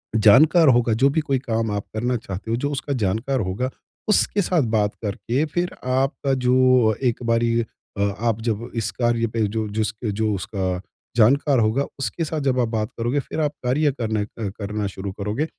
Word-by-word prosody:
जानकार 150 - +6
होगा, 120 -3 +4
जो 130 +5 +3
भी 150 - +1
कोई 135 -3 0
काम 115 -4 -1
आप 100 -1 -3
करना 120 +3 0
चाहते 110 -2 -6
हो 115 - +1
जो 145 +4 -1
उसका 140 0 -3
जानकार 115 +4 0
होगा, 105 +5 -2 0.4
उसके 205 0 +3
साथ 175 -4 +2 0.2
बात 105 -1 +1
करके 110 +6 -1
फिर 175 +3 -2
आपका 135 +1 0
जो 130 -2 +4
एक 125 -1 +1
बारी 115 0 +2
अ, 100 -2 -9 0.2
आप 115 -1 0
जब 115 0 -2
इस 115 -2 -1
कार्य 120 -1 +1
पे 110 -1 0
जो 110 +1 -2
जिस 105 0 -1 0.2
जो 110 0 0
उसका 95 -1 -3 0.4
जानकार 135 +4 +4
होगा 115 +5 +2 0.2
उसके 135 +6 -2
साथ 155 0 -3
जब 130 -2 +1
आप 120 - +2
बात 110 -1 -2
करोगे 120 +5 0
फिर 140 - -5
आप 150 -2 +1
कार्य 145 +4 +2
करने 110 -2 0
अ, 105 -1 -5
करना 105 0 -2
शुरू 95 0 -6
करोगे। 105 +9 -2
115 Hz, 190 wpm, -22 LUFS, 110-135 Hz, 0.4 s, जानकार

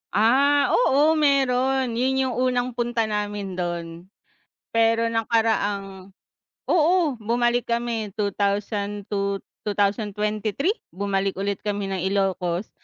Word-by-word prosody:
Ah, 275 +7 +4
oo 310 - +3
meron 265 -2 +2
'yon 265 +1 +1
yung 255 -2 -2
unang 250 -1 +1
punta 240 -1 -1
namin 205 -3 -3
do'n. 170 0 -4 0.7
Pero 230 0 +3
nakaraang 205 -4 0 0.6
oo, 335 -2 +3
bumalik 240 +2 0
kami 235 -2 -1
2002, 200 0 -1 0.2
2023, 210 - -1 0.2
bumalik 195 +1 -2
ulit 200 0 -2
kami 205 -1 -1
ng 190 -2 -2
Ilocos, 190 -1 -1
215 Hz, 100 wpm, -24 LUFS, 200-245 Hz, 0.7 s, Ah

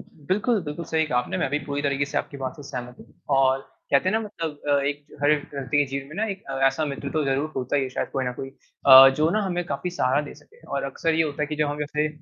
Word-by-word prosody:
बिल्कुल, 200 - -1
बिल्कुल 150 +3 -5
सही 160 0 +1
कहा 125 -5 +1
आपने 125 - -2
मैं - - 0
भी 145 - +1
पूरी 145 0 -3
तरीके 140 -1 +1
से 145 - +2
आपकी 140 - -6
बात 130 -1 -4
से 145 - -10
सहमत 125 -2 -6
हूँ - - -14 0.3
और 135 0 +3 0.3
कहते 140 +7 +4
हैं - - +1
ना 220 - +2
मतलब 165 -8 -5
अ, 145 - +4
एक 145 0 -3 0.2
हर 145 - +4
व्यक्ति 145 -2 -1
के 145 - +5
जीवन 135 0 -5
में 155 - -10
ना 215 - +1
एक 195 - -12
अ, 135 - -3
ऐसा 155 +3 +1
मित्र 140 -1 -4
तो 155 -1 +1
ज़रूर 140 +3 -1
होता 130 +2 -1
है 135 -2 0
शायद 130 - -3
कोई 130 - -1
ना 125 - -2
कोई 135 +2 -6 0.4
अ, 135 0 +11
जो 155 +1 +3
ना 215 - +1
हमें 175 -2 -1
काफ़ी 175 +4 -3
सहारा 140 -5 +1
दे - - -10
सके। 465 +2 -21
और - - -2
अक्सर 165 -1 -1
ये 160 - +3
होता 150 -1 -2
है - - 0
कि 150 0 -4
जब 150 0 +1
हम 145 0 -4
जैसे 150 +1 -1
145 Hz, 280 wpm, -24 LUFS, 135-160 Hz, 0.4 s, अ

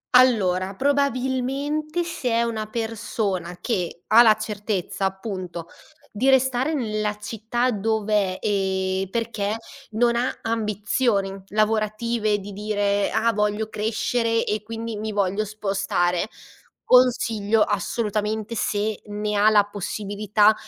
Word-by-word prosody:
Allora, 195 -7 +4
probabilmente 280 - 0
se 335 -7 -3
è 230 +1 +3
una 220 -2 -2
persona 210 -5 -3
che 180 -6 -2
ha 225 +2 +8
la 215 -2 +6
certezza 210 -3 -3
appunto 185 -3 -4 0.4
di 250 +6 +1
restare 265 +3 +3
nella 215 -5 -1
città 225 +4 -1
dov'è, 210 -2 0
ehm, 190 -1 0
perché 220 -2 -2 0.4
non 235 +2 +2
ha 250 +2 -1
ambizioni 215 -1 0 0.2
lavorative 215 0 +1
di 200 +1 -8
dire: 205 0 0
"Ah 230 +1 +3
voglio 210 +1 0
crescere 230 +2 0
e 210 0 -1
quindi 225 0 -5
mi 215 0 -4
voglio 200 +1 0
spostare", 195 -3 0 0.6
consiglio 225 -4 +3
assolutamente, 210 +1 -1
se 210 -1 -1
ne 210 0 -2
ha 210 +1 +6
la 210 -2 +5
possibilità, 205 +1 +1
215 Hz, 115 wpm, -23 LUFS, 205-230 Hz, 0.6 s, ha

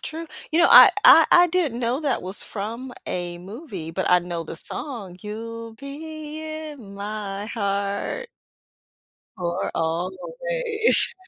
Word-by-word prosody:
true. 330 +1 -6 0.2
You 325 +2 +2
know, 345 - +6
I - - +10
I - - +9
I 350 0 +7
didn't 320 -9 0
know 245 +3 0
that 290 -4 -1
was 185 +2 -3
from 230 +5 -6
a 175 -1 -4
movie, 195 - -8
but 185 +3 -2
I 180 - +6
know 175 -1 -5
the 160 - -8
song. 205 - -6
"You'll 230 +2 -7
be 305 +4 -8
in 305 -9 -8
my 205 0 -5
heart" 200 - -2 1.1
"for 175 +1 -2
always." 445 - +2
225 Hz, 135 wpm, -23 LUFS, 190-310 Hz, 1.1 s, I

